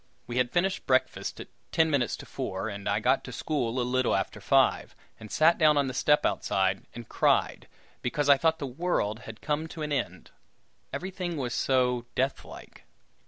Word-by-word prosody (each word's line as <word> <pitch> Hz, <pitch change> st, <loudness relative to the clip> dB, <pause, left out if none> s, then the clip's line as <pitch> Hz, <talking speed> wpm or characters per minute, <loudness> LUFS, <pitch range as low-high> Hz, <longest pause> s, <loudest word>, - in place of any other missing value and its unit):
We 120 Hz, +1 st, -5 dB
had 125 Hz, -1 st, +2 dB
finished 185 Hz, +5 st, 0 dB
breakfast -, -, 0 dB
at -, -, -9 dB, 0.2 s
ten 160 Hz, -1 st, +3 dB
minutes 130 Hz, -5 st, +1 dB
to -, -, -10 dB
four, 95 Hz, +4 st, -4 dB
and 100 Hz, 0 st, -5 dB
I 100 Hz, +1 st, +1 dB
got 130 Hz, +4 st, +2 dB
to 125 Hz, -, -7 dB
school 125 Hz, -3 st, -2 dB
a -, -, +1 dB
little 125 Hz, 0 st, +1 dB
after -, -, -3 dB
five, -, -, +2 dB, 0.2 s
and 110 Hz, -, -10 dB
sat 160 Hz, +2 st, +4 dB
down 155 Hz, -2 st, +5 dB
on 140 Hz, -, +3 dB
the 130 Hz, -, -4 dB
step 150 Hz, +3 st, +3 dB
outside 95 Hz, 0 st, 0 dB
and 120 Hz, -1 st, -8 dB
cried, -, -, +1 dB, 0.3 s
because 140 Hz, +4 st, -1 dB
I 140 Hz, -, +8 dB
thought 160 Hz, +2 st, +2 dB
the 145 Hz, -, -4 dB
world 125 Hz, -6 st, -1 dB
had 110 Hz, 0 st, -10 dB
come 155 Hz, +1 st, -1 dB
to 160 Hz, -1 st, -7 dB
an 150 Hz, -, -4 dB
end; 140 Hz, -4 st, -3 dB, 0.6 s
everything 180 Hz, -2 st, -4 dB
was 125 Hz, -3 st, -3 dB
so 125 Hz, -2 st, +1 dB
death 135 Hz, +2 st, 0 dB
like! -, -, -13 dB
130 Hz, 190 wpm, -28 LUFS, 120-155 Hz, 0.6 s, I